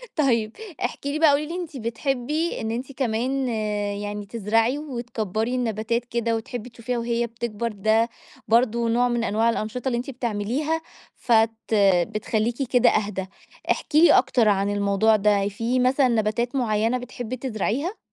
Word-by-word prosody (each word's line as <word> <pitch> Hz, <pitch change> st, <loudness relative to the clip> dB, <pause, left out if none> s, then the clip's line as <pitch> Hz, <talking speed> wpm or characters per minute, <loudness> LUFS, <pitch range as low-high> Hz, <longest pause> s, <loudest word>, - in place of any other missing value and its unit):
طيب 235 Hz, -7 st, +1 dB, 0.3 s
احكِ 245 Hz, -, -3 dB
لي 295 Hz, +2 st, -1 dB
بقى 320 Hz, -, +6 dB
قولي 290 Hz, +2 st, +1 dB
لي 340 Hz, -, -5 dB
أنتِ 335 Hz, -5 st, -5 dB
بتحبّي، 270 Hz, +7 st, -2 dB
إن 220 Hz, 0 st, -2 dB
أنتِ 250 Hz, +4 st, -4 dB
كمان 260 Hz, +1 st, -1 dB, 0.5 s
يعني 205 Hz, 0 st, -5 dB
تزرعي، 225 Hz, +4 st, +1 dB
وتكبّري 240 Hz, -5 st, -3 dB
النباتات 230 Hz, 0 st, -1 dB
كده، 235 Hz, -1 st, -1 dB
وتحبّي 240 Hz, +1 st, -5 dB
تشوفيها 235 Hz, +1 st, -4 dB
وهي 235 Hz, 0 st, -1 dB
بتكبر، 230 Hz, -1 st, -4 dB
ده 220 Hz, +3 st, +2 dB, 0.4 s
برضه 235 Hz, 0 st, +2 dB
نوع 245 Hz, +2 st, +3 dB
من 240 Hz, -1 st, 0 dB
أنواع 225 Hz, +2 st, +2 dB
الأنشطة 230 Hz, +3 st, -3 dB
اللي 240 Hz, -2 st, +1 dB
أنتِ 250 Hz, +3 st, -4 dB
بتعمليها، 250 Hz, +7 st, -2 dB, 0.3 s
فت 225 Hz, -2 st, +3 dB, 0.6 s
بتخلّيكِ 220 Hz, +3 st, -2 dB
كده 245 Hz, -1 st, +5 dB
أهدى، 200 Hz, -2 st, -1 dB, 0.5 s
احكي 305 Hz, +1 st, +2 dB
لي 345 Hz, -, +7 dB
أكتر 230 Hz, -4 st, +3 dB
عن 200 Hz, 0 st, +2 dB
الموضوع 205 Hz, +2 st, +3 dB
ده، 205 Hz, -1 st, +2 dB
في 230 Hz, +5 st, -1 dB
مثلًا 255 Hz, +1 st, +3 dB
نباتات 235 Hz, +2 st, 0 dB
معيّنة 225 Hz, 0 st, +1 dB
بتحبّي 245 Hz, 0 st, -6 dB
تزرعيها؟ 260 Hz, -, -2 dB
235 Hz, 150 wpm, -24 LUFS, 220-255 Hz, 0.6 s, لي